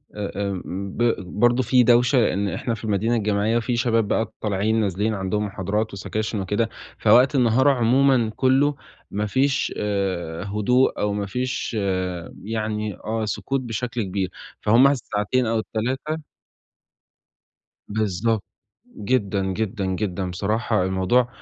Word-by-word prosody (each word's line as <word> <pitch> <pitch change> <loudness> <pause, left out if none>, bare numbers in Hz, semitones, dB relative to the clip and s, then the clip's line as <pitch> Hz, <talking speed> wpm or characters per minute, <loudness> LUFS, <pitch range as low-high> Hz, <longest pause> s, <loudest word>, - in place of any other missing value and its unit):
آآ، 100 -1 -3
آمم، 95 +1 -5
ب 120 -1 +3 0.2
برضه 120 +2 +4
في 125 0 +4
دوشة، 120 +3 +4
لإن 100 -4 +2
إحنا 115 - -2
في 110 - -7
المدينة 110 +2 +1
الجامعية 105 +1 +1
في 120 +1 -1
شباب 115 -3 +2
بقى 110 +1 -1
طالعين 105 +2 +1
نازلين 105 +2 0
عندهم 105 +1 -1
محاضرات 105 +2 -2
وسَكاشِن 105 +3 -3
وكده، 105 +4 0 0.3
فوقت 130 +4 +5
النهار 130 +2 +4
عمومًا 125 -2 +3
كُلّه 135 +2 +3 0.4
ما 105 +1 -1
فيش 135 +5 +1
آآ، 95 -5 -2
هدوء 105 +6 +2
أو 105 0 0
ما 100 0 -2
فيش 125 +4 -3 0.7
يعني 110 -2 -3
آه، 110 0 -3
سكوت 135 +5 -2
بشكل 120 0 -3
كبير، 95 -1 -2 0.3
فهم 120 +6 +6
الساعتين 125 -2 0
أو 110 0 +1
ال3 130 +8 -2 1.7
بالضبط. 110 +1 0 0.5
جدًا، 100 -3 0
جدًا، 105 0 -2
جدًا. 95 -1 -2
بصراحة 105 +2 0
الموضوع 95 +7 +2
110 Hz, 130 wpm, -23 LUFS, 100-120 Hz, 1.7 s, فهم